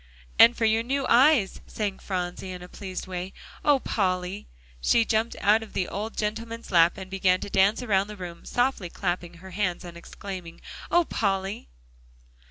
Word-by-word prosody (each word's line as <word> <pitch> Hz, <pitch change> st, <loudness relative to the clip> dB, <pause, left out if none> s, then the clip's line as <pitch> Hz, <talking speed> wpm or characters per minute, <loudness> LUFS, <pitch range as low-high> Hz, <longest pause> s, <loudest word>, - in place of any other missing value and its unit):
"And 235 Hz, +1 st, +8 dB
for 230 Hz, -, +1 dB
your 220 Hz, +1 st, +3 dB
new 270 Hz, +3 st, -1 dB
eyes," 250 Hz, -4 st, +4 dB
sang 205 Hz, -3 st, -3 dB
Phronsie 180 Hz, 0 st, -4 dB
in 180 Hz, -1 st, -7 dB
a -, -, -9 dB
pleased 185 Hz, 0 st, -6 dB
way. 185 Hz, 0 st, -5 dB, 0.3 s
"Oh, 290 Hz, -2 st, +5 dB
Polly!" 185 Hz, -3 st, -1 dB, 0.3 s
She 230 Hz, -, +4 dB
jumped 220 Hz, +1 st, 0 dB
out 215 Hz, +2 st, +4 dB
of 220 Hz, -, -10 dB
the 185 Hz, -, -1 dB
old 215 Hz, +3 st, -5 dB
gentleman's 225 Hz, +2 st, -4 dB
lap, 170 Hz, -1 st, +5 dB
and 190 Hz, -1 st, -7 dB
began 185 Hz, -1 st, +2 dB
to 200 Hz, -, -6 dB
dance 200 Hz, +5 st, +3 dB
around 200 Hz, -4 st, +2 dB
the 210 Hz, 0 st, -9 dB
room, 175 Hz, -2 st, -8 dB
softly 245 Hz, -7 st, 0 dB
clapping 175 Hz, -1 st, -3 dB
her 185 Hz, +3 st, -12 dB
hands 180 Hz, -2 st, -2 dB
and 170 Hz, -1 st, -9 dB
exclaiming, 175 Hz, 0 st, -8 dB, 0.3 s
"Oh, 345 Hz, 0 st, +4 dB
Polly!" 195 Hz, -, -2 dB
195 Hz, 175 wpm, -26 LUFS, 180-225 Hz, 0.3 s, And